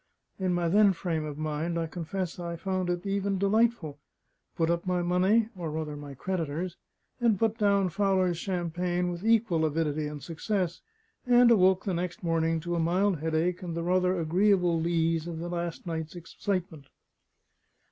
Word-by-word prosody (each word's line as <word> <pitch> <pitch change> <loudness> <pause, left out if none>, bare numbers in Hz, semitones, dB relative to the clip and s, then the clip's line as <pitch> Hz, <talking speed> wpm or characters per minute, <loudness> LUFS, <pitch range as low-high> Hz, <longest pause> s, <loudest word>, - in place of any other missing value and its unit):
In 185 -1 0
my 175 -1 0
then 200 +3 +5
frame 165 -3 -2
of 150 -1 -6
mind, 155 +2 -2
I 165 - 0
confess 175 +2 -4
I 170 -1 -4
found 185 +1 -2
it 175 +1 -2
even 200 0 0
delightful; 200 -6 +1 0.6
put 165 0 +2
up 170 0 -1
my 180 -1 +1
money 190 +6 +3
(or 170 -3 -4
rather 155 -1 -4
my 145 -1 -8
creditors'), 170 +2 -3 0.4
and 230 -4 +3
put 225 +2 0
down 200 -2 +3
Fowler's 185 -2 +1
champagne 180 -1 -1
with 175 +1 -6
equal 220 -7 +3
avidity 155 -1 0
and 150 -2 -7
success; 175 +3 -2 0.5
and 245 -1 +6
awoke 190 -3 +4
the 195 - -1
next 175 +1 -3
morning 165 -1 +1
to 175 +2 -3
a 170 - 0
mild 180 +2 +1
headache 160 +4 0
and 170 -2 -5
the 170 - -2
rather 180 +1 +2
agreeable 175 0 +2
lees 165 -1 0
of 170 -1 -5
the 170 +2 -5
last 170 -1 -4
night's 160 -1 -4
excitement. 170 -3 -4
175 Hz, 165 wpm, -28 LUFS, 165-190 Hz, 0.6 s, and